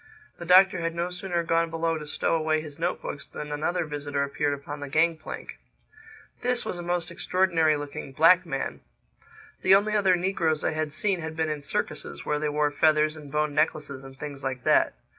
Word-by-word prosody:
The 170 - -6
Doctor 185 0 +6
had 165 0 -2
no 175 +1 -2
sooner 180 -1 -2
gone 165 0 +1
below 165 0 -1
to 150 - -8
stow - - -1
away 155 -1 +1
his 155 -1 -9
note 175 +2 -1
books 145 - -6
than 150 0 -7
another 160 +4 -1
visitor 145 -1 -2
appeared 140 +1 -1
upon 145 +1 -8
the 145 -1 -6
gang 165 +3 +3
plank. 155 - -8 0.8
This 250 0 0
was 175 - -4
a - - -4
most 175 -1 -2
extraordinary 170 -3 +2
looking 145 -1 -6
black 170 +6 +6
man. 135 -6 -4 0.8
The 190 +1 +6
only 210 +2 +2
other 195 -3 +4
negroes 170 -4 0
I - - +1
had 155 -1 -2
seen 185 +3 0
had 160 0 -5
been 160 -1 0
in 150 -1 -3
circuses, 70 - -4
where 150 0 0
they 150 0 -1
wore 150 0 +1
feathers 155 0 +3
and 150 -3 -11
bone 150 0 0
necklaces 150 -3 -1
and 135 0 -12
things 140 -1 -7
like 130 -2 -3
that. - - +3
155 Hz, 200 wpm, -26 LUFS, 145-175 Hz, 0.8 s, Doctor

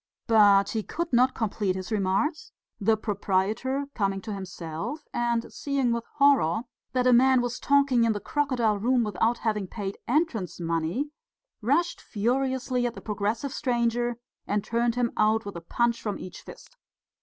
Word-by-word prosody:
But 205 -3 +5
he 220 - -1
could 335 +7 -4
not 255 +2 +4
complete 205 -4 -1
his 190 +3 -6
remarks; 215 - 0 0.3
the 220 +2 +3
proprietor 210 +6 -1
coming 195 -3 0
to 220 0 -5
himself, 185 - -6
and 235 -1 -1
seeing 275 -4 0
with 235 0 -2
horror 275 - +4 0.3
that 250 -1 +1
a 250 - +6
man 260 +1 +5
was 245 0 -2
talking 280 -4 +3
in 230 - +3
the 210 - -2
crocodile 245 -6 0
room 245 +3 +2
without 225 +2 +1
having 210 -4 -1
paid 200 0 -5
entrance 240 - 0
money, 170 - -1 0.5
rushed 295 +10 +1
furiously 250 +2 0
at 235 - -6
the - - -7
progressive 220 +6 -2
stranger 240 -3 0 0.3
and 205 0 0
turned 235 0 0
him 245 -1 +1
out 215 +1 +2
with 200 - -6
a 170 - -6
punch 235 +7 0
from 210 -2 -3
each 185 - -9
fist. - - -14
230 Hz, 160 wpm, -27 LUFS, 205-255 Hz, 0.5 s, a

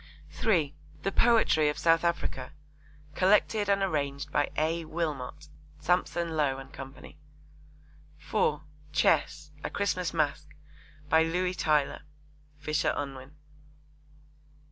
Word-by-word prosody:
(3) 160 -10 +1 0.3
The 195 - 0
Poetry 220 -10 +4
of 150 - -3
South 165 0 +3
Africa. 170 -6 -2 0.6
Collected 205 +3 +3
and 200 -1 +3
arranged 140 -6 -2
by 145 - +1
A. 165 +2 0
Wilmot. 150 -3 -4 0.3
(Sampson 170 0 0
Low 145 -3 +1
and 135 0 -10
Co.) 135 -1 -8 1.3
(4) 150 0 0 0.3
Chess. 150 -1 +1
A - - -2
Christmas 185 -3 -1
Masque. 155 -1 -1 0.5
By 160 +2 +5
Louis 180 +3 0
Tylor. 150 -5 +1 0.6
(Fisher 150 0 0
Unwin.) 135 0 -6
155 Hz, 105 wpm, -29 LUFS, 145-175 Hz, 1.3 s, By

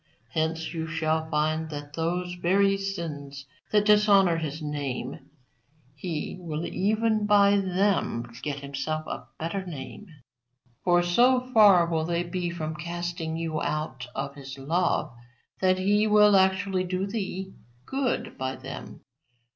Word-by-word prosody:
Hence 160 +3 -1
you 160 -1 -3
shall 160 -1 -1
find 155 +1 0
that 145 -1 -7
those 175 +3 -2
very 195 +3 +3
sins 150 -8 -5 0.3
that 210 -1 +3
dishonour 205 -4 +5
His 155 -1 -4
name 145 -4 -4 0.6
He 155 +3 -4
will 165 -2 -4
even 215 +2 +1
by 205 -1 +5
them 190 - +1 0.2
get 145 -2 -4
Himself 140 +3 -3
a - - -6
better 180 +4 -3
name; 160 +3 -8 0.8
for 175 -1 +4
so 245 +9 +4
far 200 -6 +7
will 165 -2 -1
they 170 +1 0
be 175 0 -3
from 160 -2 -4
casting 170 0 -4
you 165 -2 -2
out 150 -5 -3
of 140 - -3
His 135 -1 -9
love 165 +6 0 0.5
that 185 -1 +3
He 205 +3 +2
will 210 -1 +6
actually 190 0 +2
do 185 +1 -2
thee 195 -2 -4 0.3
good 270 -2 -2
by 130 0 -2
them. - - -9
175 Hz, 135 wpm, -27 LUFS, 155-195 Hz, 0.8 s, far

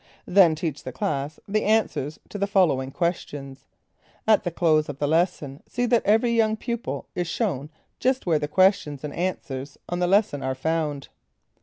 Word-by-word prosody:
Then 180 -4 +5
teach 155 -2 -3
the 130 - -5
class 140 +3 -3
the 215 +1 0
answers 200 -9 +1
to 205 - -6
the 200 - +1
following 165 -10 +2
questions. 140 -5 -4 0.6
At 215 -2 +5
the 175 - -1
close 155 -3 +2
of 145 - -5
the 145 - 0
lesson, 155 -3 0
see 245 0 -1
that 235 -1 +3
every 225 +3 +4
young 220 -1 +2
pupil 225 - -4
is 175 -1 -2
shown 165 - -2 0.3
just 260 +1 +1
where 165 -4 +2
the 150 - -2
questions 155 -5 +2
and 150 - -5
answers 145 -6 -4
on 175 - -3
the 180 - +2
lesson 195 -6 +2
are 130 0 -2
found. 150 0 -2
165 Hz, 175 wpm, -25 LUFS, 145-200 Hz, 0.6 s, Then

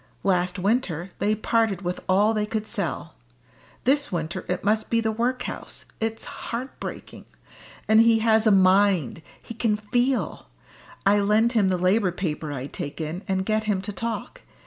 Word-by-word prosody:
Last 180 -1 +1
winter 190 -4 -1
they 210 +1 +2
parted 220 -3 0
with 180 0 -2
all 205 +4 +4
they 210 -1 -1
could 215 0 -2
sell. 165 - -4 0.7
This 285 +1 +2
winter 165 -2 -3
it 180 - -2
must 215 +2 +1
be 230 - +2
the 220 -1 0
workhouse! 245 +3 -3
It's 225 0 -3
heart 245 +3 -6
breaking. - - -8 0.6
And 220 +1 +6
he 230 0 +5
has 220 0 +3
a - - +6
mind; 190 - +3 0.2
he - - -9
can 225 -2 +1
feel! 245 +5 -1 0.6
I 205 +1 +5
lend 210 +3 +3
him 215 -6 +3
the 185 - +1
Labour 185 +2 +2
paper 160 -4 -3
I 135 -2 -4
take 145 +1 -6
in, 160 +3 -4
and 190 -1 0
get 215 +1 0
him 205 -3 +1
to 205 +1 -5
talk. 230 - -5
210 Hz, 170 wpm, -25 LUFS, 185-225 Hz, 0.7 s, And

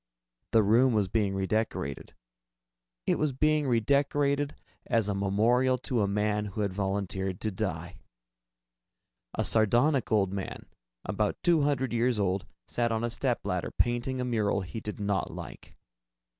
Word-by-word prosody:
The 110 -1 +5
room 120 +5 +4
was 105 -3 +2
being 100 -1 0
redecorated. 95 - -2 0.9
It - - +1
was 150 -3 +1
being 155 +2 +2
redecorated 140 +4 +1 0.3
as 115 -3 +2
a 105 - 0
memorial 115 +7 +2
to 125 -3 -1
a 100 - +2
man 105 +1 0
who 105 +1 -4
had 100 -2 -1
volunteered 95 -1 -2
to 110 - -1
die. 90 -3 -4 1.4
A - - 0
sardonic 120 +5 +2
old 100 -3 +2
man, 95 -1 -5 0.4
about 100 +2 -1
two 170 -3 +4
hundred 135 -3 0
years 120 0 +2
old, 95 -1 0 0.2
sat 120 -1 0
on 110 0 -1
a 120 - -1
stepladder, - - -1
painting 120 +2 0
a 125 - -1
mural 110 -4 +1
he 95 +5 -6
did 105 0 -6
not 100 -1 -1
like. - - -9
110 Hz, 145 wpm, -29 LUFS, 100-125 Hz, 1.4 s, The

